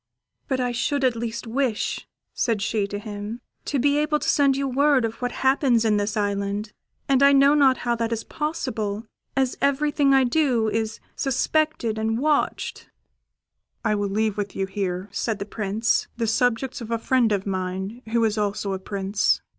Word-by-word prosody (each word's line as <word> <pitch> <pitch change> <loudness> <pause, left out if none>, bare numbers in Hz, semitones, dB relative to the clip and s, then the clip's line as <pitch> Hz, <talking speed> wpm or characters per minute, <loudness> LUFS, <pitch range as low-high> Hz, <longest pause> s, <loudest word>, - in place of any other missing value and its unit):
] - - -52
"But 265 -3 0
I 250 -1 0
should 275 +4 -1
at 255 -2 +3
least 235 +1 -4
wish," 240 -1 -1 0.3
said 230 -4 0
she 215 -2 0
to 205 - -4
him, 205 +2 -6 0.3
"to 285 - -1
be 285 +3 +3
able 300 0 +2
to - - -4
send 275 -2 +3
you 275 0 0
word 270 -1 +3
of 225 +2 -5
what 245 0 -1
happens 265 -4 +3
in 215 -2 +3
this 205 +1 -1
island, 205 +1 -2 0.3
and 270 -1 +3
I 280 0 +7
know 275 +1 +6
not 270 -4 +5
how 240 - +2
that 230 0 -1
is 225 -1 -2
possible, 230 -9 -3 0.3
as 265 -2 +1
everything 280 0 +2
I 270 -1 +5
do 250 -4 +2
is 220 0 -2 0.2
suspected 270 -4 0
and 220 +1 0
watched." 295 +3 -1 1.0
"I - - +3
will 205 -1 -1
leave 215 +1 0
with 205 -1 -3
you 195 - 0
here," 190 -1 -3
said 220 +1 -2
the 200 - -5
Prince, 210 +2 0
"the 230 - 0
subjects 245 +3 0
of 230 - -7
a 230 - 0
friend 240 -1 +2
of 200 -2 0
mine, 190 +4 -3
who 230 0 +2
is 215 0 0
also 205 -1 -1
a 190 - -3
prince. 195 +1 0
230 Hz, 185 wpm, -24 LUFS, 205-270 Hz, 1.0 s, I